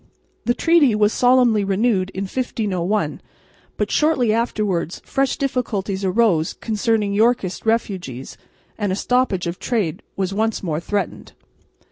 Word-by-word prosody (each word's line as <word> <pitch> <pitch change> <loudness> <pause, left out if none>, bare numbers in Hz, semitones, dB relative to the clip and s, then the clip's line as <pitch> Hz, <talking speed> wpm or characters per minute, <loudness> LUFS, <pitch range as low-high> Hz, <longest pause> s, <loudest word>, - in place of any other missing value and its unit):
The 240 - +2
treaty 325 -9 +4
was 210 0 +3
solemnly 245 -4 +4
renewed 195 -1 +1
in 190 - -2
1501, 205 -3 -2 0.6
but - - -1
shortly 280 -8 +2
afterwards 210 -7 -1
fresh 270 -1 0
difficulties 210 -8 -2
arose 185 -5 +2
concerning 215 -2 -1
Yorkist 220 -2 +1
refugees, 185 - -2 0.4
and 205 -3 0
a - - 0
stoppage 245 -5 +1
of 170 +1 -4
trade 210 -11 -1
was 190 0 -2
once 220 +1 -1
more 160 -4 -1
threatened. 200 +4 -4
210 Hz, 125 wpm, -21 LUFS, 190-240 Hz, 0.6 s, treaty